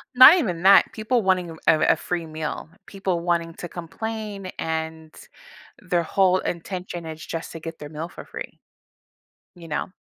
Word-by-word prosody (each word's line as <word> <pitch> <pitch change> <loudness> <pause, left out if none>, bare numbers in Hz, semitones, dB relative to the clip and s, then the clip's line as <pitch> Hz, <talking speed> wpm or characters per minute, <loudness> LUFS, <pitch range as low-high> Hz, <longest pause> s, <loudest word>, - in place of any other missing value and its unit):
Not 260 +7 +11
even 180 - -1
that, 195 +1 +7
people 230 +2 0
wanting 185 -3 +1
a - - -9
a 155 - +5
a - - -2
free 175 -2 -3
meal, 155 0 -5 0.2
people 190 -3 -2
wanting 170 -1 0
to 175 - -7
complain, 205 +3 -5
and 160 -1 -4 0.6
their 175 -3 0
whole 185 +2 +3
intention 180 -1 -5
is 160 -1 -7
just 165 0 -5
to 165 - -7
get 165 0 -7
their 150 - -7
meal 160 +3 -6
for - - -10
free. - - -8 1.0
You 170 -2 -12
know? 150 - -2
175 Hz, 170 wpm, -24 LUFS, 160-195 Hz, 1.0 s, Not